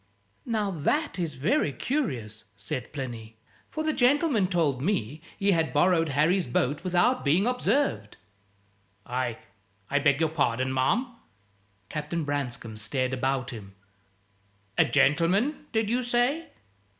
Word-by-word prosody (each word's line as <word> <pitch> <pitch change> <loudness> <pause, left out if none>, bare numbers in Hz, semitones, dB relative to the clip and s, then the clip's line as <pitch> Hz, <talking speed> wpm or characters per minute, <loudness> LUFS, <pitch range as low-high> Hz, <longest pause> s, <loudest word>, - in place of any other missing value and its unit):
"Now, 215 -4 0
that 195 - -1
is 165 -5 -2
very 155 - +1
curious," 125 - -3
said 110 +5 -5
Plinny; 115 -6 -7 0.3
"for 310 - -3
the 310 0 +1
gentleman 265 - +3
told 160 -8 0
me 150 - -1 0.2
he 200 0 +2
had 160 -6 +1
borrowed 165 +1 +3
Harry's 160 +6 +2
boat 135 +6 0
without 185 +8 +2
being 165 +8 +3
observed." 250 - 0 0.9
"I 125 -2 -2 0.5
I 145 - +3
beg 140 0 +3
your 160 -1 +2
pardon, 130 -4 0
ma'am!" 235 - 0 0.7
Captain 155 +4 -3
Branscome 125 -6 -3
stared 130 +4 -2
about 130 -1 -1
him. 100 -4 -10 1.0
"A - - +5
gentleman, 165 - +2
did 220 -1 +1
you 240 +4 +1
say?" 245 +6 0
155 Hz, 125 wpm, -27 LUFS, 130-215 Hz, 1.0 s, A